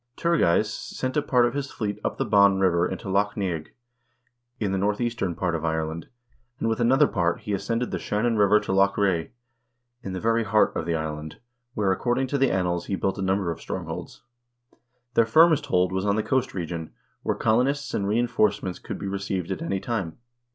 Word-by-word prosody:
Tur 170 -1 +1
geis 105 +6 +2
sent 130 0 -4
a 150 - +3
part 125 -4 +3
of 120 - 0
his 140 -1 -3
fleet 105 -2 -4
up - - -2
the - - 0
Bann 100 -1 +5
River 90 -2 +3
into - - -6
Loch 100 +2 0
Neagh, 85 -6 -2 0.9
in 105 -3 -1
the 95 - 0
northeastern 105 -2 -1
part 85 -1 -1
of 80 -1 -2
Ireland, 80 0 -2 0.5
and 115 - -2
with 115 +1 0
another 130 +5 +5
part 85 -8 0
he 105 - -4
ascended 115 +5 -1
the - - -2
Shannon 115 +3 0
River 105 0 +5
to - - -4
Loch 100 +1 +3
Ree, 95 -5 +1 0.7
in 95 - -6
the 95 - -3
very 115 +2 +1
heart 110 0 +2
of 80 - -3
the 85 - +1
island, 80 -1 -5 0.4
where, 100 -3 +1
according 120 +6 0
to 140 - 0
the 135 - +4
annals, 90 -2 -1
he 100 - -1
built 95 +2 -2
a - - -2
number 95 -2 0
of 80 - -7
strongholds. - - -6 0.9
Their 115 -1 +4
firmest 155 +3 +5
hold 90 -7 +2
was 95 +2 -1
on 100 - +2
the 110 - 0
coast 130 -2 0
region, 85 -2 -5 0.3
where - - -1
colonists 130 +6 +1
and 100 - -1
reinforce 110 -1 +1
ments 95 -2 -4
could - - -6
be - - -6
received 95 -2 -3
at 95 - -3
any 95 +3 -1
time. 95 -7 -3
100 Hz, 205 wpm, -25 LUFS, 90-115 Hz, 0.9 s, Bann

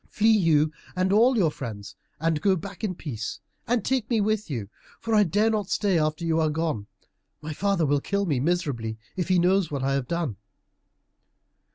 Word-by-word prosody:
Flee, 220 +1 +4
you 155 -6 +3 0.2
and 185 +1 +1
all 240 +4 +5
your 170 -7 +3
friends, 105 -7 -7 0.2
and 160 -1 0
go 195 -2 +3
back 195 +5 -8
in 190 -4 -1
peace, 115 -10 -5 0.3
and 240 -3 +1
take 260 -4 0
me 230 -3 +2
with 215 -1 0
you. 115 -8 -3 0.3
For 225 - -3
I 215 - +6
dare 210 +4 +2
not 210 -3 -1
stay 195 -5 +2
after 155 +2 -1
you 165 0 +1
are 160 -1 +2
gone. 150 -9 -2 0.5
My 155 +1 -6
father 195 0 +1
will 145 0 +2
kill 200 +4 -1
me 145 -8 0
miserably, 135 -8 -1 0.2
if 180 - -2
he 185 -1 +3
knows 180 0 +3
what 140 -3 -3
I 135 0 +1
have 135 -2 -1
done." 165 - -2
170 Hz, 195 wpm, -26 LUFS, 145-200 Hz, 0.5 s, I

